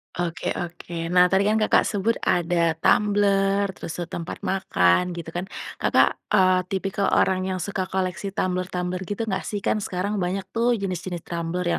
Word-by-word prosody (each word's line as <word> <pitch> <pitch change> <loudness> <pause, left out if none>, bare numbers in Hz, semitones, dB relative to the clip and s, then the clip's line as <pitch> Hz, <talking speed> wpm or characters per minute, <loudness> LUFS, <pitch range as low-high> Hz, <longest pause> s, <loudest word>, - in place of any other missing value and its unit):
Oke 175 -1 -3
oke, 175 0 -6 0.2
nah 180 0 +7
tadi 190 +2 +2
kan 220 - +2
Kakak 215 - +4
sebut 210 +3 +1
ada 175 0 +1 0.2
tumbler, 200 0 +3
terus, 160 - -6
eee, 175 - -4
tempat 170 0 -5
makan 90 - +3
gitu 170 -1 -7
kan, 180 +2 -2 0.4
Kakak, - - +4 0.2
eee, 185 -1 +5
tipikal 195 +1 -1
orang 185 0 +3
yang 185 -1 -2
suka 195 +1 -2
koleksi 190 +1 -2
tumbler-tumbler 180 -1 -2
gitu 205 +2 -3
nggak 190 -2 -1
sih? 205 - -2
Kan 215 - +1
sekarang 195 +3 -2
banyak 190 +1 -2
tuh 240 +1 +3
jenis-jenis 185 -2 -4
tumbler 170 +1 -3
185 Hz, 165 wpm, -24 LUFS, 180-195 Hz, 0.4 s, nah